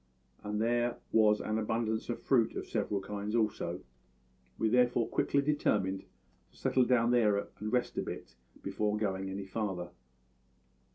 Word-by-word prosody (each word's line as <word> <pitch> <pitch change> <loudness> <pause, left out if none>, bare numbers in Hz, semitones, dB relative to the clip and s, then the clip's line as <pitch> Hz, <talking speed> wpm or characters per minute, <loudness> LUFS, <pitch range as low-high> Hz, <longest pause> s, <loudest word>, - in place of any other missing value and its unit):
And 105 0 -2
there 120 +1 +1
was 105 -1 +5
an 110 +1 -1
abundance 110 +1 -1
of 120 - -3
fruit 120 -5 +3
of - - -4
several 100 -1 -1
kinds 105 +2 -4
also; 100 -5 0 0.8
we 110 - +1
therefore 120 0 +3
quickly 140 0 +1
determined 100 -10 +1 0.4
to - - -24
settle 130 -1 +2
down 120 -1 +3
there 110 -4 +4 0.2
and 110 +1 -3
rest 125 -1 0
a - - +1
bit 65 - -7 0.3
before 105 +2 -1
going 95 -2 -1
any 95 +1 -5
farther. 95 -4 -3
110 Hz, 150 wpm, -32 LUFS, 100-120 Hz, 0.8 s, was